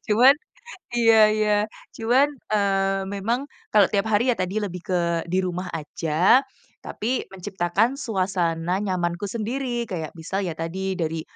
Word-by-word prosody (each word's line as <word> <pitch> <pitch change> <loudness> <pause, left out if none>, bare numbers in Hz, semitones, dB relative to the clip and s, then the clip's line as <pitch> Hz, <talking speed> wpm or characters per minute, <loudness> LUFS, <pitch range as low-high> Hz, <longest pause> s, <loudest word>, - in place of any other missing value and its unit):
Cuman 245 +6 +7 0.6
iya 225 -1 +5
iya. 215 0 +1 0.4
Cuman, 245 +5 +3 0.2
eee, 195 -1 +1
memang 230 +7 -1 0.3
kalau 210 -2 +6
tiap 205 +1 0
hari 235 +4 +3
ya - - -11
tadi 185 +3 -2
lebih 180 -4 -3
ke 180 - +2 0.3
di 185 - 0
rumah 180 +1 -3
aja, 165 - +2 0.4
tapi 240 -1 -3
menciptakan 190 +4 0
suasana 185 - -1
nyamanku 185 0 -2
sendiri. 240 +2 -2
Kayak, 165 -7 -5
misal 190 +5 -3
ya 170 -5 -4
tadi 190 +3 -3
dari 160 -2 -2
195 Hz, 135 wpm, -24 LUFS, 180-225 Hz, 0.6 s, Cuman